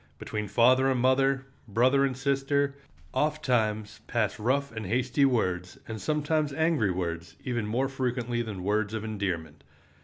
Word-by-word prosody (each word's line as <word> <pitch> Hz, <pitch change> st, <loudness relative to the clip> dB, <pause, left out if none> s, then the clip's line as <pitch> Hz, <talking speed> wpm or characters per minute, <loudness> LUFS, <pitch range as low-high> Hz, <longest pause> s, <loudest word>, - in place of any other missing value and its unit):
Between 105 Hz, +4 st, -4 dB
father 130 Hz, +5 st, +4 dB
and 130 Hz, -2 st, +1 dB
mother, 135 Hz, +2 st, +3 dB, 0.2 s
brother 130 Hz, +6 st, +3 dB
and 130 Hz, -2 st, -2 dB
sister, 140 Hz, +1 st, +1 dB, 0.4 s
ofttimes 120 Hz, -9 st, 0 dB
pass 115 Hz, 0 st, 0 dB
rough 140 Hz, +5 st, +1 dB
and 110 Hz, -3 st, -5 dB
hasty 125 Hz, +6 st, +2 dB
words, 90 Hz, -8 st, 0 dB
and 110 Hz, -1 st, -6 dB
sometimes 150 Hz, 0 st, 0 dB
angry 160 Hz, -, +2 dB
words, 85 Hz, -2 st, -3 dB
even 120 Hz, -4 st, -2 dB
more 125 Hz, +5 st, +1 dB
frequently 125 Hz, -2 st, -1 dB
than 105 Hz, -6 st, -5 dB
words 105 Hz, +2 st, 0 dB
of 110 Hz, -, -3 dB
endearment. 95 Hz, -8 st, -3 dB
120 Hz, 145 wpm, -28 LUFS, 105-135 Hz, 0.4 s, father